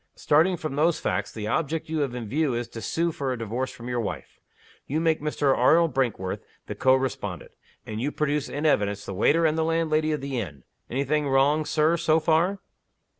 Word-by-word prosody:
Starting 170 +5 +3
from 155 -3 -4
those 160 +2 +2
facts, 100 +2 -2
the 110 -2 -6
object 155 +8 -1
you 160 0 -2
have 135 -4 -1
in 120 -3 -5
view 145 +2 0
is 120 0 -3
to 115 - -9
sue 170 +9 0
for 140 -4 -3
a 125 - -2
Divorce 115 +4 -3
from 120 - -10
your 125 -1 -1
wife. 115 - -5 0.5
You 150 +4 -1
make 160 -2 +1
Mr. 145 -2 +1
Arnold 160 +6 +4
Brinkworth 115 -8 -1 0.2
the - - -5
co 130 0 +4
respondent. 130 -1 -3 0.3
And 110 +1 -5
you 145 +4 -1
produce 150 -1 -1
in 145 +2 -3
evidence 105 -8 +1
the 100 - -5
waiter 150 - +3
and 160 0 +2
the - - +2
landlady 160 -1 +1
of 150 - -2
the 135 -2 -3
inn. 70 - -7 0.3
Any 135 +3 -1
thing 150 +1 0
wrong, 140 +3 +3
Sir, 155 +3 +2
so 160 -1 +3
far?" 165 +5 +2
145 Hz, 210 wpm, -25 LUFS, 120-155 Hz, 0.5 s, Arnold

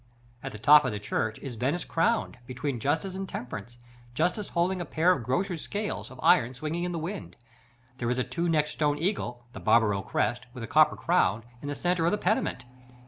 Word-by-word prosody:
At 135 - -5
the - - -8
top 150 +7 +7
of 130 - -1
the 105 - -4
church 110 +2 -2
is 130 -5 -6
Venice 140 +9 -1
crowned, 210 - 0
between 130 0 -3
Justice 160 - 0
and 190 0 -5
Temperance, 120 -1 -7 0.4
Justice 195 - 0
holding 180 +2 0
a - - -1
pair 165 +3 +3
of 140 - +1
grocer's 165 - -1
scales, 210 0 -4
of 130 - -13
iron, 125 +2 +4
swinging 155 +6 -3
in 180 - -2
the 170 - -3
wind. 175 +5 -5 0.6
There 120 - -1
is 125 - 0
a 125 - +1
two 170 +4 -2
necked 150 -2 +2
stone 145 -1 0
eagle 135 - -2
(the - - -7
Barbaro 105 -4 +3
crest), 120 +5 -1
with 120 - -6
a - - -4
copper - - +5
crown, 110 +3 +2 0.2
in 145 - -6
the 145 - -3
centre 175 +1 +1
of - - +3
the 210 - +1
pediment. 185 - 0
145 Hz, 210 wpm, -28 LUFS, 120-175 Hz, 0.6 s, top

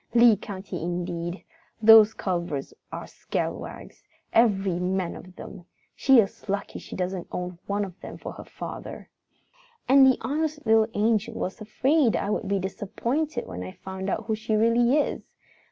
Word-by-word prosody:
Lee 235 -2 +7
County 190 -3 -7
indeed! 175 +1 -3 0.4
Those 220 -1 +8
Culvers 170 -8 -3 0.2
are - - -6
scalawags, - - -5 0.3
every 195 -6 +3
man 180 -1 -1
of 185 0 -12
them! 175 - -10 0.3
She 270 -1 +5
is 200 -1 -1
lucky 200 +1 -3
she - - -9
doesn't 185 -1 -3
own 180 -1 -5
one 205 0 0
of 185 -2 -12
them - - -8
for - - -7
a - - -7
father. - - -8 0.8
"And 270 +1 +7
the 260 - +4
honest 300 +4 -2
little 220 0 +5
angel 220 +1 +1
was 190 +5 -4
afraid 260 +4 +2
I 200 - -1
would 210 - -2
be 200 0 +1
disappointed 230 - -2
when 90 -1 -7
I 90 0 -6
found 190 +1 -6
out - - -2
who 220 - -1
she 215 0 -1
really 235 +4 +4
is. 300 - 0
205 Hz, 160 wpm, -26 LUFS, 185-230 Hz, 0.8 s, Those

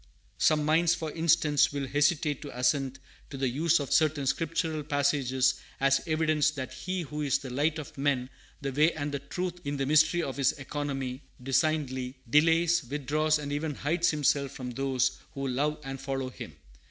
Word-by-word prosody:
Some 150 -1 +3
minds, 165 +2 +3
for 160 -3 -4
instance, 160 -2 +3
will 140 -1 -3
hesitate 145 +2 +1
to 140 -5 -8
assent 135 0 +1 0.3
to 135 - -7
the 135 0 0
use 155 +6 +2
of 140 - -2
certain 155 -3 +2
Scriptural 160 +2 -1
passages 140 -3 +1 0.2
as 140 0 +3
evidence 155 -1 +2
that 130 -4 -6
He 180 +7 -3
who 150 0 -5
is 145 -1 +2
the 135 -2 -8
Light 150 +5 0
of 155 - -8
men, 135 -2 0 0.3
the 140 -1 -2
Way 150 +5 +3
and 145 -2 -3
the 140 - -2
Truth, 175 +5 -5
in 145 -1 -3
the 135 - -1
mystery 155 +4 +4
of 135 -3 -4
His 135 -2 +3
economy, 135 -2 -4 0.2
designedly 135 -2 0
"delays, 165 +5 +4
withdraws, 150 +4 0
and 145 -1 -5
even 150 0 -2
hides 165 +6 +1
Himself 145 -2 +1
from 125 -2 -6
those 130 0 0 0.2
who 135 0 -3
love 145 +4 -1
and 135 -1 -6
follow 135 -1 -3
Him." - - -10
145 Hz, 180 wpm, -29 LUFS, 135-155 Hz, 0.3 s, mystery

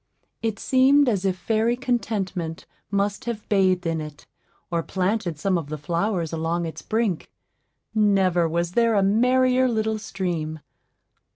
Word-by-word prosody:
It 225 -2 -1
seemed 270 +4 +4
as 200 -5 +1
if 185 -1 +1
fairy 225 +5 +1
Contentment 205 -10 -2 0.2
must 200 +1 -1
have 235 -3 -4
bathed 185 -3 +2
in 165 -1 -1
it, 150 -1 -9 0.5
or 170 -1 +1
planted 185 -1 -1
some 185 +2 +1
of 150 -3 -8
the 155 - -4
flowers 170 +2 -1
along 165 +1 -1
its 160 - -6
brink; 220 -6 -1 0.6
never 190 -5 +3
was 170 +1 -1
there 230 +2 +3
a 200 - +3
merrier 255 +5 +3
little 220 -2 0
stream. 170 -7 -3
195 Hz, 145 wpm, -24 LUFS, 170-225 Hz, 0.6 s, seemed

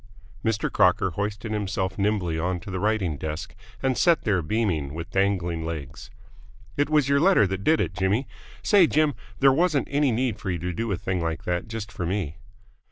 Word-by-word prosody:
Mr. 110 -2 0
Crocker 90 0 +3
hoisted 105 +4 -3
himself 100 -3 -2
nimbly 95 -5 0
onto 90 +2 -3
the 95 - -3
writing 100 -6 0
desk, 80 +2 -5 0.3
and 130 -1 +2
sat 170 +3 +3
there, 100 -4 +1
beaming, 80 -6 -1
with 85 +1 -6
dangling 90 -4 0
legs. 80 -5 -6 0.7
"It 145 +1 +1
was 150 -3 +3
your 140 0 +3
letter 180 - +5
that 95 +1 -3
did 160 +6 +3
it, - - -1
Jimmy. 95 +8 0 0.4
Say, 195 -5 +5
Jim, 155 -1 +2 0.3
there 135 -1 +6
wasn't 160 -1 +2
any 145 -2 +2
need 120 -1 -1
for - - -4
you 90 - -1
to 90 +2 -3
do 115 +5 -2
a 95 - 0
thing 90 0 -2
like 80 0 -3
that 90 +2 -2
just 110 -1 -6
for 90 -6 -4
me." 90 -5 -2
100 Hz, 190 wpm, -25 LUFS, 90-120 Hz, 0.7 s, there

